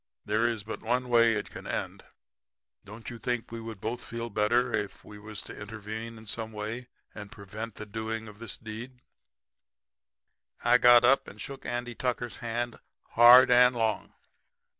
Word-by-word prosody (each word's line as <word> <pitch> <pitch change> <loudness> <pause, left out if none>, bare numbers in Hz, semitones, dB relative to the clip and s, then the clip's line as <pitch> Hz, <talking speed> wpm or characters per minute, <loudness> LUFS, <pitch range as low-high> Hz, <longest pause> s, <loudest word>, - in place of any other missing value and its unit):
There 110 +3 +2
is 115 -4 -2
but 110 - -6
one 125 +2 -1
way 115 -1 +5
it 105 - -4
can - - -9
end. - - -4 0.8
Don't 105 +4 -9
you 120 - -9
think 120 -1 -2
we 115 0 -6
would 115 -3 -8
both 115 +4 -4
feel 115 0 -5
better 120 +4 +2
if 100 - -3
we 105 -1 -11
was 105 -1 -8
to - - -10
intervene 110 +2 -7
in 110 - -13
some 110 +1 -4
way 110 +4 -5 0.3
and 105 -2 -9
prevent 110 +2 -8
the 105 - -7
doing 110 +1 -4
of 105 0 -13
this 115 -3 -7
deed?' 120 +3 -8 1.6
"I 125 +1 +5
got 120 0 +7
up 135 +2 +4
and - - -12
shook 135 -1 -7
Andy 120 0 -3
Tucker's 125 -1 -3
hand 120 +1 -3 0.3
hard 120 +2 +8
and 125 0 +6
long. 110 -2 -1
115 Hz, 170 wpm, -29 LUFS, 110-120 Hz, 1.6 s, hard